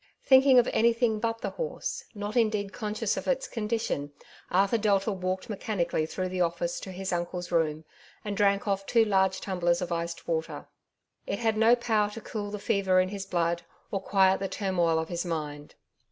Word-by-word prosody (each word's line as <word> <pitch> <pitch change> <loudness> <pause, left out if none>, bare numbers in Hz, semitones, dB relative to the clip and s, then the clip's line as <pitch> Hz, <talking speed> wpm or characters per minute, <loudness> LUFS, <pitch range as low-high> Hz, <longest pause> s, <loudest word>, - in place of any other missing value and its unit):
Thinking 265 0 +6
of 245 - +6
anything 230 -1 +2
but 225 +1 -2
the - - -3
horse, - - -4
not 205 +2 -5
indeed 210 -4 +1
conscious 215 0 -2
of - - -5
its 270 -1 0
condition, 210 - -2 0.4
Arthur 195 +5 +2
Delta 205 0 +2
walked 185 -1 -3
mechanically 185 -6 -1
through 185 +2 -3
the 185 0 -2
office 170 0 -1
to 190 - -8
his 190 +1 -4
uncle^s 175 0 -3
room, 160 -2 0 0.4
and 205 -1 -2
drank 200 0 +2
off 195 -1 0
two 230 -2 +4
large 190 -2 +2
tumblers 175 -3 0
of 180 -1 -4
iced 170 0 -3
water. 160 -1 -2 0.6
It - - -1
had 225 -2 +1
no 225 +2 +5
power 220 -4 +1
to 225 +2 -8
cool 210 -2 -5
the 210 - -4
fever 195 -2 +2
in 185 0 +2
his 195 -1 -6
blood, 170 -1 0 0.3
or 195 - -1
quiet 190 -1 +3
the 195 - -2
turmoil 175 -5 +1
of 160 0 -2
his 170 -1 -2
mind. 150 -4 -5
195 Hz, 185 wpm, -28 LUFS, 175-215 Hz, 0.6 s, Thinking